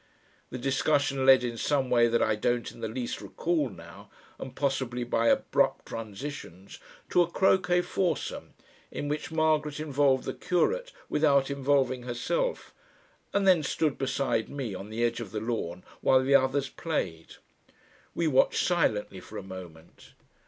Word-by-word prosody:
The 125 - -6
discussion 135 +1 +1
led 130 -1 +7
in 120 -1 -3
some 135 0 0
way 120 -1 +5
that 115 0 +2
I - - +2
don't 120 +3 -1
in - - -15
the 110 - -3
least 120 +2 -4
recall 145 - -1
now, 85 -4 -13 0.3
and 130 - -8
possibly 130 -3 -1
by 115 -1 +1
abrupt - - +2
transitions, 105 - -8 0.3
to 180 - +5
a 175 - +1
croquet 180 -1 +3
foursome 175 -3 -2 0.3
in 145 - -5
which 150 +1 -3
Margaret 155 -2 +1
involved 140 -3 +2
the - - -4
curate - - 0 0.2
without 140 -2 +2
involving 135 -2 +1
herself, 125 - -2 0.6
and 200 -1 +1
then 180 -4 +6
stood 150 0 -1
beside 135 -4 -1
me 135 -7 -4
on 95 +2 -7
the 115 +2 -2
edge 115 0 0
of 115 -4 -6
the 105 +2 -4
lawn 105 -6 -3 0.2
while 130 0 +4
the 135 +1 +2
others 135 0 +3
played. 90 - -4 0.8
We 170 - 0
watched 140 -4 +3
silently 110 - 0
for 110 - -10
a - - -6
moment. 90 -4 -12
130 Hz, 155 wpm, -28 LUFS, 115-150 Hz, 0.8 s, led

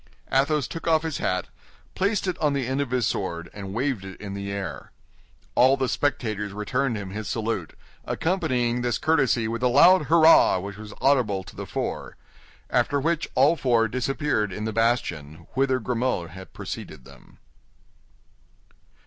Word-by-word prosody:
Athos 140 +1 +2
took 165 - -7
off 160 -1 +3
his 160 -3 -3
hat, 90 0 -1 0.5
placed 200 +2 0
it 185 - -1
on 150 -2 +2
the 140 -3 -1
end 130 +3 -1
of 140 - -3
his 125 -2 +1
sword, 85 -4 -3
and 100 -2 -7
waved 125 -4 -1
it 95 -1 -9
in 100 -1 -6
the 100 0 -5
air. 95 -10 -5 0.6
All 130 +5 +5
the 130 -1 0
spectators 110 -8 -1
returned 120 +4 -1
him 100 -2 -6
his 105 +1 -5
salute, 115 0 -3 0.3
accompanying 130 -9 0
this 120 -1 0
courtesy 135 -8 +2
with 115 +1 -3
a 125 - +3
loud 175 +7 +6
hurrah 165 - +6
which 100 +2 -6
was 105 0 -10
audible 120 -9 +2
to - - -13
the - - -7
four; - - -4 0.5
after 140 - +2
which 165 +3 -1
all 140 +6 +5
four 120 -6 +2
disappeared 125 -2 -1
in 105 +3 -5
the 110 - -3
bastion, 85 -9 -1
whither 130 0 +1
Grimaud 115 -8 -2
had 95 +2 -11
preceded 70 -5 -8
them. - - -17
120 Hz, 165 wpm, -25 LUFS, 100-140 Hz, 0.6 s, loud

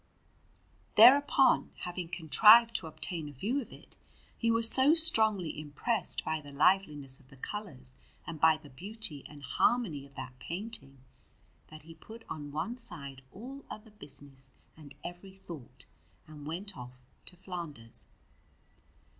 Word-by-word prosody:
Thereupon, 265 +3 +6
having 180 -1 -5
contrived 215 +8 +6
to 165 - -8
obtain 160 -1 -4
a - - -11
view 230 - -1
of 235 - -11
it, - - -16 0.4
he 230 - -1
was 230 0 +5
so 265 +6 +6
strongly 220 - +3
impressed 165 +8 -1
by 160 0 -2
the 145 -1 -12
liveliness 145 -4 +2
of - - -22
the 140 - -17
colours 150 - -8 0.3
and 165 -2 -7
by 160 -1 +5
the 150 -3 -16
beauty 180 - -5
and 145 -1 -13
harmony 150 - 0
of 140 - -25
that 130 -1 -9
painting, 170 - -8 0.6
that 155 -1 -13
he 165 +1 -12
put 220 +8 -13
on 145 -2 -7
one 165 - -3
side 140 - -3
all 265 +7 -10
other 215 +1 -10
business 140 -8 -5 0.3
and 145 -3 -14
every 175 +2 -9
thought 170 -9 -11 0.4
and 150 -1 -11
went 190 +6 -4
off 125 0 -11 0.3
to 180 - -5
Flanders. 165 -11 -7
165 Hz, 145 wpm, -31 LUFS, 145-220 Hz, 0.6 s, Thereupon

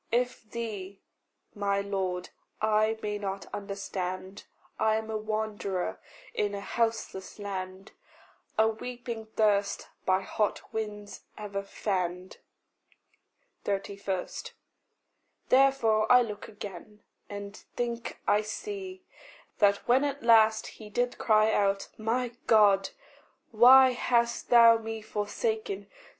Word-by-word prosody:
If 245 -2 -1
thee, 205 -5 -5 0.5
my 200 -1 0
Lord, 190 -3 -2 0.3
I 215 +1 +2
may 210 0 -2
not 195 -1 -4
understand, 195 -1 -5 0.3
I 220 0 +3
am 220 0 -3
a - - -2
wanderer 215 - -2 0.3
in 205 -1 -1
a - - -4
houseless 225 -3 -2
land, 190 -1 -6 0.7
A 220 - +5
weeping 230 0 -5
thirst 205 -2 +1
by 185 0 +2
hot 210 +2 -1
winds 210 -2 -5 0.2
ever 200 -2 -4
fanned. 185 -2 -3 1.3
31. 195 -1 -2 1.2
Therefore 250 -5 +4
I 250 0 +8
look 210 -3 -7
again 205 0 -10 0.3
and 200 0 -7
think 235 0 -5
I 210 - +4
see 375 - -6 0.6
That, 200 -1 +3
when 255 +3 +4
at 285 -2 -2
last 220 -1 +5
he 215 -2 -10
did 245 +3 -1
cry 215 -1 +4
out, 195 -2 +1
"My 240 +3 -1 0.2
God, 205 -3 +5 0.6
Why 255 +3 +8
hast 235 -1 0
thou 230 -1 +8
me 225 -1 -6
forsaken?" 210 -1 -2
215 Hz, 110 wpm, -29 LUFS, 200-230 Hz, 1.3 s, I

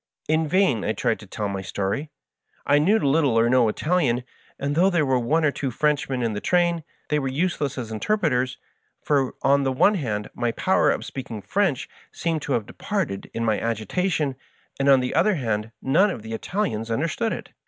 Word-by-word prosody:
In 155 +1 +2
vain 185 - +2
I 110 - 0
tried 115 -1 0
to 105 - -12
tell 105 +2 -3
my 100 -1 -3
story. 100 - -3 0.6
I 145 +1 +4
knew 195 +9 +4
little 140 - +2
or 115 +1 +4
no 125 -3 +4
Italian, 140 -2 +1 0.3
and, 140 +1 -2
though 175 +5 +4
there 170 -5 +2
were 130 -2 +2
one 155 +7 +1
or 145 - +3
two 140 -1 -3
Frenchmen 135 -1 0
in 115 -2 0
the 105 - -4
train, 175 -2 +2 0.3
they 150 - +2
were 135 - -2
use 165 +7 -1
less 140 -1 -1
as 115 -3 -5
interpreters, 130 - 0 0.5
for 140 -3 +1
on 140 +1 +4
the 135 -1 0
one 130 +11 +4
hand 110 - -3
my 120 -1 -1
power - - +2
of - - -1
speaking 130 -5 -6
French 180 - 0 0.2
seemed 165 -2 -2
to 140 - -2
have 115 -4 0
departed 170 - -3
in 115 - -2
my 110 -2 +1
agita 115 - -1
tion, 145 -5 -1 0.4
and 135 +1 +3
on 135 -2 +6
the 125 - -2
other 205 +3 +3
hand 110 -6 -2
none 170 +10 +4
of 115 - -5
the 110 0 -6
Italians 115 - -2
under 135 +9 0
stood 225 +7 -1
it. - - -5
135 Hz, 205 wpm, -24 LUFS, 115-165 Hz, 0.6 s, on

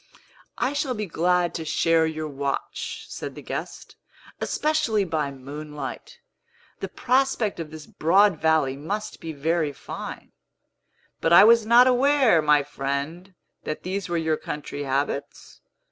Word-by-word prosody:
"I 260 +3 0
shall 275 -3 -1
be 210 -1 -3
glad 175 0 +1
to 165 - -4
share 165 +1 +2
your 155 -1 -4
watch," 140 -1 -4
said - - -7
the - - -10
guest; - - -6 0.4
"especially 300 -9 +1
by 160 -5 -1
moonlight. 150 - -8 0.6
The - - -4
prospect 255 -5 0
of 160 -2 -5
this 155 -1 -10
broad 190 +2 +3
valley 160 -4 +2
must 200 +10 -5
be 165 - -5
very 160 +1 0
fine. - - -8 0.9
But 165 - +2
I 175 - +10
was 230 0 +6
not 240 +2 +7
aware, 260 - +4
my 150 -1 +4
friend, 145 +6 -4 0.3
that 155 - -5
these 190 +1 -3
were 170 - 0
your 160 -1 0
country 145 -1 -6
habits. 140 +1 -3
165 Hz, 140 wpm, -24 LUFS, 150-210 Hz, 0.9 s, I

